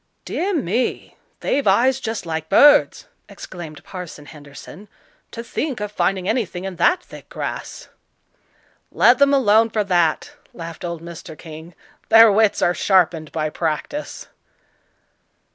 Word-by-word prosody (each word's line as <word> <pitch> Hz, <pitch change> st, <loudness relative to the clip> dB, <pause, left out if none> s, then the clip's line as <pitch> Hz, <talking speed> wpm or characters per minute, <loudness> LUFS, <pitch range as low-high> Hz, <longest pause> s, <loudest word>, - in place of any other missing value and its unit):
"Dear 390 Hz, +3 st, -2 dB
me! 245 Hz, -, -2 dB, 0.3 s
they've 280 Hz, -3 st, -1 dB
eyes 250 Hz, +7 st, +3 dB
just 225 Hz, -6 st, -5 dB
like 160 Hz, -1 st, -4 dB
birds!" 290 Hz, +8 st, +5 dB, 0.2 s
exclaimed 165 Hz, -5 st, -10 dB
Parson 180 Hz, -5 st, -9 dB
Henderson; 145 Hz, +7 st, -13 dB, 0.4 s
"to 230 Hz, -, -8 dB
think 270 Hz, +1 st, -4 dB
of 210 Hz, 0 st, -5 dB
finding 190 Hz, -3 st, -1 dB
anything 200 Hz, -6 st, -2 dB
in 190 Hz, -2 st, -6 dB
that 355 Hz, -, +2 dB
thick -, -, -14 dB
grass." -, -, -6 dB, 1.0 s
"Let 245 Hz, +1 st, +4 dB
them 280 Hz, 0 st, +4 dB
alone 225 Hz, -4 st, +4 dB
for 215 Hz, -1 st, -1 dB
that," 175 Hz, -5 st, 0 dB, 0.2 s
laughed 165 Hz, 0 st, -9 dB
old 170 Hz, -2 st, -5 dB
Mr. 165 Hz, -2 st, -10 dB
King; 160 Hz, +1 st, -11 dB, 0.3 s
"their 225 Hz, -1 st, +8 dB
wits 215 Hz, 0 st, +2 dB
are 175 Hz, -, +3 dB
sharpened 175 Hz, -5 st, +1 dB
by 155 Hz, -1 st, -3 dB
practice." 165 Hz, -, -4 dB
190 Hz, 130 wpm, -20 LUFS, 165-230 Hz, 1.0 s, their